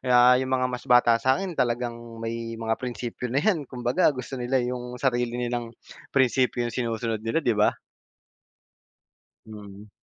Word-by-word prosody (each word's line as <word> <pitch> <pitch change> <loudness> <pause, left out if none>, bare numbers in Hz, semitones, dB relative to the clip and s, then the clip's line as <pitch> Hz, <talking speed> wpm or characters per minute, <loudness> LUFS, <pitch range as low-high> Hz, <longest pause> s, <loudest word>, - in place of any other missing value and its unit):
na 125 -1 +6
'yong 130 - -3
mga 130 -1 +1
mas 125 0 -3
bata 120 -1 +5
sa'kin 180 +8 +1
talagang 120 -3 -2
may 115 0 -5
mga 115 0 -2
prinsipyo 125 0 -5
na 125 - -3
'yan. 160 - 0
Kumbaga, 125 +6 +1
gusto 125 +1 -6
nila 125 +2 0
'yong 125 0 -4
sarili 120 -2 0
nilang 120 -1 -3 0.4
prinsipyo 125 -2 +2
sinusunod 115 -2 -2
nila, 115 +8 0
'di 120 - +3
ba. 105 - +4 1.8
Mm. 105 -1 -11
120 Hz, 145 wpm, -25 LUFS, 115-125 Hz, 1.8 s, na